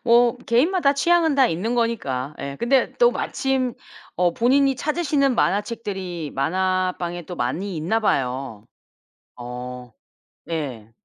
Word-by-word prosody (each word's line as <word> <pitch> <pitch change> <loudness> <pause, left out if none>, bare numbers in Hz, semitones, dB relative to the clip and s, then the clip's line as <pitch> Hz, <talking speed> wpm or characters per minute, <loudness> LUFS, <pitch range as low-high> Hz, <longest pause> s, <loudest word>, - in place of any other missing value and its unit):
뭐 240 0 +5
개인마다 280 +5 +3
취향은 330 0 +3
다 270 -2 +5
있는 215 +8 -1
거니까. 150 - -1
예 140 0 -5
근데 260 +2 +2
또 485 0 +6
마침 265 -2 -1 0.4
어 175 -1 +2
본인이 270 +3 +3
찾으시는 290 -3 +1
만화책들이 190 - -2
만화방에 180 +3 -1
또 180 - -6
많이 170 +11 -2
있나 175 +9 0
봐요. 130 - -1 0.7
어. 125 0 -7 0.6
예. 130 -10 -4
190 Hz, 250 characters per minute, -23 LUFS, -, 0.7 s, 또